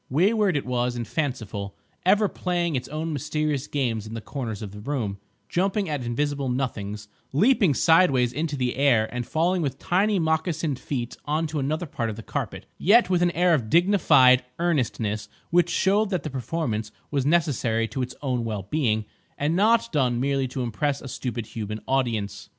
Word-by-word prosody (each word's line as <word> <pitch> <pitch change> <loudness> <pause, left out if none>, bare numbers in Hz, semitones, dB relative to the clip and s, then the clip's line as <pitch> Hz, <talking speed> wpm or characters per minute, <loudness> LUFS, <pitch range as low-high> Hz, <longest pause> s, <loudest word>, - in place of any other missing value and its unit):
Wayward 190 - +3
it 140 - -3
was 125 -1 -1
and 120 -2 -4
fanciful, 110 -9 -3 0.3
ever 205 +2 +5
playing 175 -4 -1
its 125 - -2
own 155 +2 -3
mysterious 150 -1 -1
games 115 -7 -1
in 110 - -7
the - - -3
corners 115 -4 -5
of 100 - -6
the 105 - -10
room, 105 -5 -3 0.3
jumping 195 +2 0
at 145 -4 -2
invisible 140 +3 -1
nothings, 105 -5 -3 0.2
leaping 195 - +4
sideways 140 -8 +4
into 150 +1 -2
the 125 -2 -1
air 125 -6 +4
and 120 -1 -3
falling 175 +3 +1
with 135 -3 -2
tiny 200 +7 +1
moccasined 160 -3 0
feet 125 -4 -4
on 155 +2 0
to 155 -1 -3
another 155 +5 -1
part 120 -6 -3
of 110 - -4
the 115 - -9
carpet, - - -4
yet 210 +1 +5
with 180 -1 +3
an 175 - +4
air 175 +1 +3
of 120 -9 0
dignified 160 - +5
earnestness 115 -10 -1 0.2
which 175 0 +4
showed 195 +5 +2
that 185 -4 -1
the 155 - -4
performance 125 -5 -3 0.2
was 140 -3 +1
necessary 135 -8 +1
to 130 - -4
its 125 0 -4
own 125 -3 0
well 105 -4 -3
being, 110 -8 +1 0.3
and 150 +3 0
not 225 +4 +3
done 125 -5 +1
merely 135 0 0
to 130 0 -4
impress 140 +5 -1
a - - -7
stupid 120 -2 -4
human 110 -1 -5
audience. 120 -6 -1
140 Hz, 180 wpm, -25 LUFS, 120-165 Hz, 0.3 s, ever